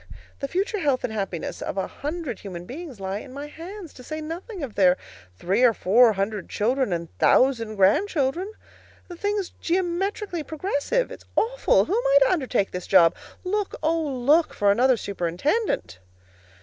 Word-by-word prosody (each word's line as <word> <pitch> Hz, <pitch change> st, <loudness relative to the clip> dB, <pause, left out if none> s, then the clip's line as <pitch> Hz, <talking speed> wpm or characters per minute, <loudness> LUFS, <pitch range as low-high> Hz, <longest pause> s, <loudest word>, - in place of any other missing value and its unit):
The 275 Hz, -, -3 dB
future 395 Hz, -, -1 dB
health 285 Hz, -6 st, +1 dB
and 220 Hz, -, -2 dB
happiness 195 Hz, -5 st, -4 dB
of -, -, -4 dB
a 190 Hz, -, 0 dB
hundred 295 Hz, -, -5 dB
human 175 Hz, -3 st, -8 dB
beings 275 Hz, -, -8 dB
lie 195 Hz, +1 st, -3 dB
in 260 Hz, -, -11 dB
my 285 Hz, +1 st, -5 dB
hands, 340 Hz, +4 st, -9 dB
to 250 Hz, -, -13 dB
say 310 Hz, +5 st, -5 dB
nothing 340 Hz, +4 st, -6 dB
of 250 Hz, -6 st, -5 dB
their 185 Hz, -2 st, +4 dB, 0.4 s
three 190 Hz, -, 0 dB
or 240 Hz, -3 st, +5 dB
four 225 Hz, +4 st, +5 dB
hundred 200 Hz, 0 st, -3 dB
children 250 Hz, +2 st, 0 dB
and 170 Hz, -1 st, -4 dB
thousand 230 Hz, -5 st, +3 dB
grandchildren. 290 Hz, -, +2 dB, 0.6 s
The 350 Hz, -, -7 dB
thing's 405 Hz, +1 st, -2 dB
geometrically 365 Hz, +1 st, -1 dB
progressive. 320 Hz, +10 st, -1 dB
It's -, -, -10 dB
awful. -, -, +3 dB
Who 370 Hz, -, -2 dB
am 480 Hz, -, +1 dB
I -, -, +5 dB
to -, -, +2 dB
undertake 255 Hz, -, 0 dB
this 180 Hz, 0 st, -6 dB
job? 170 Hz, -3 st, +6 dB, 0.3 s
Look, 400 Hz, +2 st, -2 dB
oh, 325 Hz, +1 st, +2 dB
look 290 Hz, +3 st, +2 dB
for 205 Hz, -1 st, +3 dB
another 250 Hz, +4 st, +4 dB
superintendent! 180 Hz, -, -1 dB
275 Hz, 165 wpm, -24 LUFS, -, 0.6 s, job